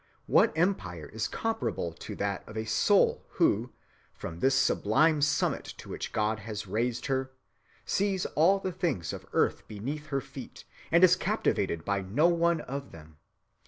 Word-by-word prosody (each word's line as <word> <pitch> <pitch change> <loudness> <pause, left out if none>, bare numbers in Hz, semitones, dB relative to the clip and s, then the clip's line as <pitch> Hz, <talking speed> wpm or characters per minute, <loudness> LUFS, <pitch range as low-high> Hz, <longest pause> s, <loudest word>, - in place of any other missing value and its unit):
What - - +4
empire 95 - 0
is 110 -1 -1
comparable 225 - -2
to 85 - -8
that 100 -1 -2
of 110 - -8
a 110 - -2
soul 110 - +3
who, 120 - +2 0.4
from 85 - -7
this 135 +5 +3
sublime 145 +5 +3
summit 150 +1 +1
to - - -11
which - - -5
God 110 0 0
has 105 0 -6
raised 115 +5 -1
her, 130 -1 -1 0.5
sees 195 -2 0
all 175 +6 +3
the 190 -1 -3
things 135 - -2
of - - -8
earth - - +1
beneath 140 +9 -5
her 140 -2 -1
feet, - - -10 0.3
and 170 +2 +5
is 185 0 +8
captivated 85 - -1
by 100 -1 0
no 115 - +2
one 170 -1 +2
of 140 0 -6
them? 80 -2 -14
130 Hz, 160 wpm, -29 LUFS, 100-165 Hz, 0.5 s, is